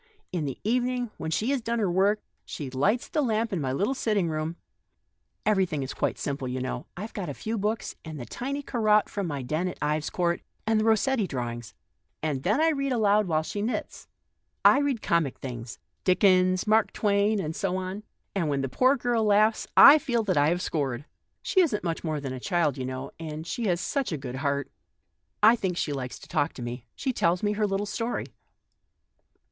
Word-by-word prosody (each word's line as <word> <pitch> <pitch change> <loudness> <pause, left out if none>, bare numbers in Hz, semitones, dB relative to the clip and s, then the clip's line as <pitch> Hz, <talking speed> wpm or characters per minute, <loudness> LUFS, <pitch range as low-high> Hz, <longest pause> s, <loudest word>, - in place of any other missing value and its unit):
In 170 -4 -2
the 135 - -4
evening, 245 +1 0
when 160 - -4
she 215 - 0
has 275 -3 0
done 235 +1 -1
her 205 -5 +1
work, 200 +4 +2 0.2
she 140 -4 -6
lights 200 - +1
the 305 - 0
lamp 225 -3 0
in 175 - -1
my 130 -2 -1
little 200 - 0
sitting 210 -9 0
room 155 +1 -2 0.9
(everything 190 -9 +1
is 130 - -5
quite - - -1
simple, 140 -2 -3
you 125 +1 -3
know; 130 0 -2
only - - -7 0.2
I've 220 - -7
got 185 -6 -4
a 140 - -5
few 220 +1 -3
books, 215 +1 -2
and 155 -2 -7
the 120 - -6
tiny 275 - -4
Corot 215 -5 +2
from 200 -3 -3
my 140 -4 -3
den 155 +8 -1
at 180 - -5
Ives 150 +1 -1
Court, 175 -1 0 0.2
and 220 0 +2
the - - +1
Kossetti 225 0 +2
drawings), 120 -4 -5 0.5
and 145 -4 -1
then 210 - +1
I 325 +1 +4
read 275 -3 -1
aloud 210 -3 +3
while 160 -2 +1
she 205 +5 -4
knits. 225 +4 -4 0.6
I 275 - +8
read 280 -6 0
comic 170 -7 +1
things 120 -3 -7
— - - -49
Dickens, 185 -1 +4
Mark 215 0 +3
Twain, 205 0 +2
and 160 -3 -3
so 190 -3 -1
on; 185 +2 -4 0.3
and 170 -6 0
when 140 -1 0
the 135 - -2
poor 255 - +3
girl 240 -2 +1
laughs, 215 +1 +3
I 295 +2 +10
feel 245 -6 0
that 190 -4 0
I 145 +1 +4
have 175 +2 0
scored 135 -6 -1
one. - - -21 0.4
She 375 - +3
isn't 275 - +1
much 165 -2 -2
more 155 -3 -1
than 135 -2 -5
a 130 - -5
child, 170 -2 +1
you 130 -2 -4
know, 130 +1 -5
and 155 -1 -6
she 230 +6 -3
has 175 -2 +1
such 275 +4 -1
a 155 - -1
good 130 -2 -6
heart. 140 0 -1 0.7
I 225 +3 +8
think 190 -6 -2
she 150 - -1
likes 130 -2 -5
to - - -14
talk 145 - 0
to 125 - -7
me; 120 0 -6
she 265 -2 -2
tells 175 -3 +1
me 205 - +2
her 210 0 +1
little 195 +1 -1
story." 230 +3 -2
185 Hz, 215 wpm, -27 LUFS, 150-220 Hz, 0.9 s, I